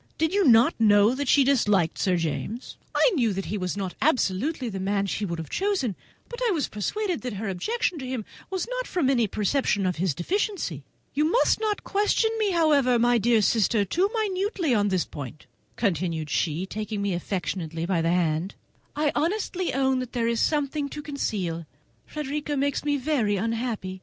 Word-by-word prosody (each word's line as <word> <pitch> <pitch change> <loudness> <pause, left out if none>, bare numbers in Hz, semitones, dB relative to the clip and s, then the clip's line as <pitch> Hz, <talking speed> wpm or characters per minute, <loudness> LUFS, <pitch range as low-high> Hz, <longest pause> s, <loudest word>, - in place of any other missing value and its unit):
Did 320 +2 +1
you 400 -2 +3
not 230 -1 +6
know 210 +1 +5
that 280 +1 -3
she 280 +2 +5
disliked 210 - +2
Sir 185 -2 +2
James?" 170 - -4 0.2
"I - - +5
knew 235 - +2
that 195 0 -3
he 210 - -3
was 185 +1 -3
not 190 -3 -3
absolutely 265 - +1
the 195 -4 -4
man 200 +1 0
she 205 +1 -2
would 170 -3 -3
have 160 -1 -7
chosen, 375 - 0 0.3
but 480 - -8
I 480 - +3
was 325 -9 0
persuaded 360 - -2
that 250 -2 -4
her 210 +2 -4
objections 350 - -1
to 260 - -6
him 250 -5 -3 0.3
did 375 0 -2
not - - -3
arise - - -14
from 310 -8 +2
any 240 -4 +2
perception 210 0 0
of 180 -2 0
his 170 -4 0
deficiency. 345 - -2 0.3
You 300 +3 +2
must 485 - +3
not 430 -2 -1
question 420 +2 +1
me, 425 -2 +2
however, 295 -8 +3
my 240 0 +3
dear 225 0 +3
sister, 215 -1 +2
too 360 - +1
minutely 395 - 0
on 205 -2 +2
this 185 -3 +1
point," 145 0 -9 0.3
continued 165 -7 -1
she, 165 +2 0
taking 215 +1 -4
me 200 -2 0
affectionately 170 -2 -3
by 175 -2 +1
the 165 - +1
hand; 170 +1 0 0.4
"I 295 -1 +1
honestly 365 +1 -1
own 265 0 +1
that 255 -1 -6
there 235 -2 0
is 230 -1 0
something 290 -1 0
to 295 +1 -7
conceal. 185 - -3 0.4
Frederica 295 0 -3
makes 280 +1 0
me 290 -1 +1
very 255 -7 +1
unhappy! 225 -3 -2
235 Hz, 190 wpm, -26 LUFS, 190-300 Hz, 0.4 s, not